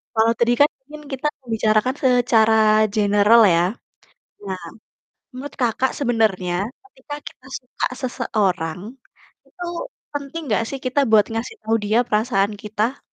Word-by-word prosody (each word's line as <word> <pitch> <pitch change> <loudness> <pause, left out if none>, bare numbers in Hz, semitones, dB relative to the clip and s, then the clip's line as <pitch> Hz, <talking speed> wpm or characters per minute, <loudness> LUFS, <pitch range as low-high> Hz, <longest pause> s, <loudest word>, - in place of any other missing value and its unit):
Kalau 225 +1 +4
tadi 240 +1 +3
kan 290 - +6 0.2
mungkin 300 +2 -11
kita 270 +2 -2 0.3
bicarakan 220 +4 +2
secara 240 -3 +4 0.4
general 205 +2 +5
ya, 170 0 +3 0.8
nah 190 -3 -5 0.7
menurut 280 +3 -7
Kakak 245 +2 +1
sebenarnya 220 -8 +1 0.3
ketika 290 -6 -10
kita 255 - -12
suka 250 -1 -4 0.2
seseorang, 185 -9 -1 0.7
itu 355 -2 -8 0.5
penting 290 +3 -5
gak 230 - +2
sih 275 - -5
kita 260 +3 +1
buat 215 -2 +6
ngasih 225 - -4
tau 225 - +1
dia 215 +3 +2
perasaan 210 -2 +1
kita? 215 +5 -2
225 Hz, 130 wpm, -21 LUFS, 210-260 Hz, 0.8 s, kan